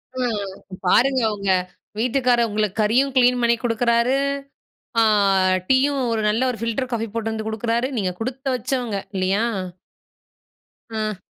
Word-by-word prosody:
ஆ, - - -4 0.7
பாருங்க 260 +7 +4
உங்க 200 -1 -1 0.5
வீட்டுக்கார் 245 0 +2
உங்களுக்கு 210 0 -1
கறியும் 255 +6 +2
கிளீன் 250 -1 +4
பண்ணி 235 0 +3
குடுக்குறாரு, 235 +2 +2 0.8
ஆ - - +5 0.6
டீயும், 275 +2 +3
ஒரு 225 -1 0
நல்ல 220 +3 0
ஒரு 240 - -7
ஃபில்டர் 230 +3 -2
காஃபி 225 -1 -1
போட்டுட்டுந்து 220 -1 -3
குடுக்குறாரு. 230 +3 -1
நீங்க 190 -4 0
குடுத்து 260 +4 -4
வச்சவங்க, 245 -3 -2 0.2
இல்லையா? 190 +3 +1 1.5
ம். 215 -2 -3
230 Hz, 120 wpm, -22 LUFS, 220-255 Hz, 1.5 s, ஆ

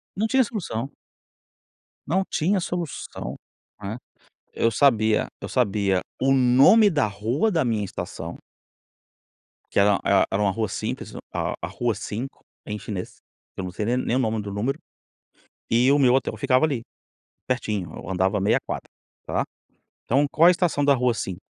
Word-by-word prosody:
Não 215 +3 0
tinha 265 +2 +4
solução. 165 - -4 1.2
Não 190 +5 +2
tinha 185 +5 +1
solução, 170 -3 -5 0.5
né. 105 +4 -4 0.6
Eu 115 - +2
sabia 110 -4 +3
eu - - -6
sabia 100 -6 +1 0.2
o 135 +1 +4
nome 135 - +6
da 145 - +2
rua 110 - 0
da 160 -6 +2
minha 110 -4 0
estação 90 -2 -6 1.3
que - - +2
era 100 0 +4
e - - +1 0.2
era 100 +2 0
uma 100 - +3
rua 110 +3 -1
simples, - - -4 0.2
a - - -1
a 85 - -3
rua 115 +5 -1
5, 120 +6 -6 0.2
em 105 0 -4
chinês, 100 -4 -6 0.4
que - - -4
eu - - -4
não 90 - -5
sei 105 - -3
nem 120 +3 +1
nem 125 -1 0
o - - +2
nome 110 -3 0
do 100 - -6
número, 120 +9 -2 0.9
e 125 +4 +4
o 145 - +4
meu 130 -2 +5
hotel 135 - +1
ficava 140 +1 +3
ali, 140 -7 -1 0.7
pertinho, 105 -7 -2
eu - - -8
andava 95 +2 +1
meia 100 - +3
quadra, - - -5 0.4
tá. - - 0 0.6
Então 140 +4 +2
qual 165 - +5
a - - +9
estação 170 -5 +1
da 140 - +5
rua 125 -2 +1
5? 95 -4 -5
120 Hz, 165 wpm, -24 LUFS, 105-140 Hz, 1.3 s, a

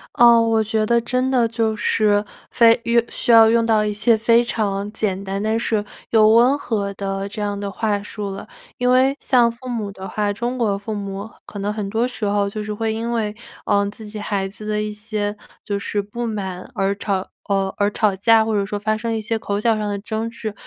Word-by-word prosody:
呃， 235 -1 +7
我 225 -1 +2
觉 215 0 0
得 235 +1 +2
真 255 +2 -1
的 240 -3 +3
就 225 -1 -1
是 210 -1 +2 0.3
非 230 -1 +5
遇 235 0 +3
需 240 - -1
要 225 -1 +8
用 230 0 +3
到 220 -2 +3
一 210 - -1
些 225 +2 +3
非 230 +2 +4
常 205 -3 -2
简 200 -3 -2
单 195 +1 -3
但 220 +1 0
是 215 -3 0 0.3
又 215 -1 +6
温 240 +5 +5
和 200 -7 -2
的 195 0 -3
这 210 +1 -6
样 205 -1 -2
的 200 -1 -4
话 205 -1 -1
术 210 -1 -5
了。 195 +2 -7 0.3
因 250 0 +2
为 265 +2 +3
像 240 -3 +3
父 250 +2 -12
母 220 -5 -3
的 190 0 -8
话， 205 -1 -1
中 240 +5 -3
国 205 -4 +1
父 215 +2 -5
母 200 +1 -5 0.2
可 205 - -9
能 205 +1 -2
很 210 -2 -4
多 225 +4 0
时 220 -4 -4
候 200 0 +1
就 210 +1 -5
是 210 - -5
会 220 0 -1
因 230 +1 -3
为， 215 -2 -1 0.3
呃， 200 -1 +3
自 215 +1 -10
己 210 0 -7
孩 200 -2 -2
子 210 +2 -10
的 210 0 0
一 210 - -3
些 210 -1 -3 0.3
就 200 -1 -2
是 205 +1 -2
不 235 +4 -5
满 190 -4 -5
而 195 +1 0
吵 195 -2 -2 0.2
呃， 195 -1 0
而 205 0 +1
吵 205 -3 +1
架， 220 +2 +4
或 220 - -1
者 205 -1 +1
说 205 0 -3
发 215 +1 0
生 230 +1 -3
一 - - -1
些 220 +1 -2
口 200 -1 -2
角 225 0 +2
上 210 -1 -2
的 205 - -2
争 220 +2 -3
执。 225 -3 -6
215 Hz, 245 characters per minute, -21 LUFS, 205-230 Hz, 0.3 s, 要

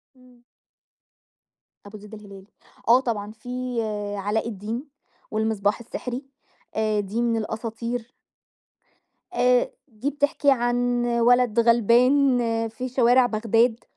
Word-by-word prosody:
إمم. 250 -1 -22 1.4
أبو 205 +1 -10
زيد 210 +1 -14
الهلالي، 200 -2 -12 0.4
آه 240 +2 +7
طبعًا 215 -5 -3
في 250 +2 -5 0.4
علاء 205 +3 -1
الدين، 230 +6 -5 0.4
والمصباح 215 -2 0
السحري، 245 +3 -6 0.5
آآ، 215 -1 +1
دي 205 +4 -2
من 230 -1 +1
الأساطير. 225 +2 -4 1.2
آآ، 250 -6 +3 0.2
دي 245 +2 -4
بتحكي 285 0 +1
عن 245 -1 +1
ولد 240 -1 +3
غلبان 245 +4 +4 0.3
في 250 +4 -6
شوارع 250 0 +4
بغداد، 230 +1 +1
235 Hz, 105 wpm, -24 LUFS, 220-250 Hz, 1.4 s, آه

